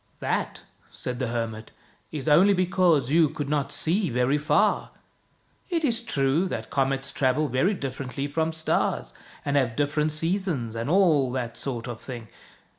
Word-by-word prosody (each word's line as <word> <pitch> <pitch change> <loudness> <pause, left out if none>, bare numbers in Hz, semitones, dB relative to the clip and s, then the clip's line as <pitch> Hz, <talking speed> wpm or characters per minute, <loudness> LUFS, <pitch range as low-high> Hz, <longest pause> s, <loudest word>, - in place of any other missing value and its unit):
" - - -37
That," - - -2 0.3
said 125 -1 -6
the 130 - -1
hermit, 115 -2 -4 0.2
" - - -35
is 150 -1 -5
only 185 +7 +6
because 180 -7 +2
you 160 -1 +5
could 145 0 -4
not 145 -2 0
see 180 +3 +1
very 125 +4 +1
far. 150 - +2 0.8
It 335 -3 0
is 235 -6 +2
true 150 - +1
that - - -5
comets 135 0 0
travel 135 +3 +1
very 135 - +1
differently 135 -1 -4
from 160 +2 0
stars, 160 - -1 0.3
and 140 0 0
have 125 -4 +1
different 150 +2 +1
seasons, 165 - -1
and 115 +4 -3
all 160 -8 +4
that 120 -3 -3
sort 120 -4 -3
of 120 -2 -6
thing. 120 -4 -8
140 Hz, 165 wpm, -26 LUFS, 125-165 Hz, 0.8 s, only